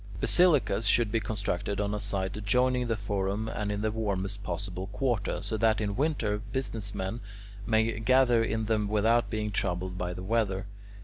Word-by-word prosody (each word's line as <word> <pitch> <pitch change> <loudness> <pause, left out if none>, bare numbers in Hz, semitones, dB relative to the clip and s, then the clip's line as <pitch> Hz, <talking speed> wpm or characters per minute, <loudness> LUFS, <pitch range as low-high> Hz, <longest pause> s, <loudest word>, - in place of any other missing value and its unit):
Basilicas 145 - +3
should 115 0 +3
be 115 - +2
constructed 100 -2 -2
on 105 0 0
a 105 - -1
site 100 -2 -2
adjoining 125 +4 +1
the 115 - +1
forum 100 +1 -2
and 105 -2 -2
in 105 0 -2
the 110 0 0
warmest 100 -2 -2
possible 95 0 -4
quarter, 105 -3 -1
so 110 +2 -2
that 110 0 +3
in 100 -2 -1
winter 125 -8 0
business 110 -2 -3
men 95 +5 -3 0.5
may 110 -1 +2
gather 125 0 +4
in 110 0 -1
them 105 -1 +1
without 110 +1 +2
being 105 0 -2
troubled 90 -1 -2
by 90 0 -2
the 90 +1 -6
weather. 100 -2 0
105 Hz, 175 wpm, -29 LUFS, 100-115 Hz, 0.5 s, gather